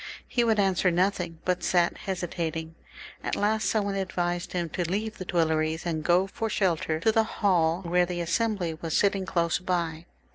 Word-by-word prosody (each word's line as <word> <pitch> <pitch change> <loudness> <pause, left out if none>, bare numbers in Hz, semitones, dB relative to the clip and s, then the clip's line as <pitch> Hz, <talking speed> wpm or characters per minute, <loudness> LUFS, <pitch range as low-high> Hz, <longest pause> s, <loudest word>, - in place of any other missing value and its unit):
He 240 - +1
would 220 -2 +2
answer 190 -2 +3
nothing, 180 -1 0
but 180 -1 +1
sat 175 -1 +2
hesitating. 165 -3 -4 0.5
At - - -1
last 215 +1 +1
some 215 -2 +1
one 200 - -1
advised 175 -2 -2
him 175 -2 -1
to 170 +1 -2
leave 215 +3 -2
the 185 - -5
Tuileries, 160 -2 0
and 160 -3 -2
go 180 +3 +4
for 225 +3 -4
shelter 165 -6 0
to 220 - +4
the 225 - +4
hall 180 -5 +1
where 175 0 +2
the 175 -1 -3
Assembly 175 0 0
was 160 0 -2
sitting 195 -2 +1
close 170 -1 +1
by. 170 -3 -2
180 Hz, 180 wpm, -27 LUFS, 170-195 Hz, 0.5 s, go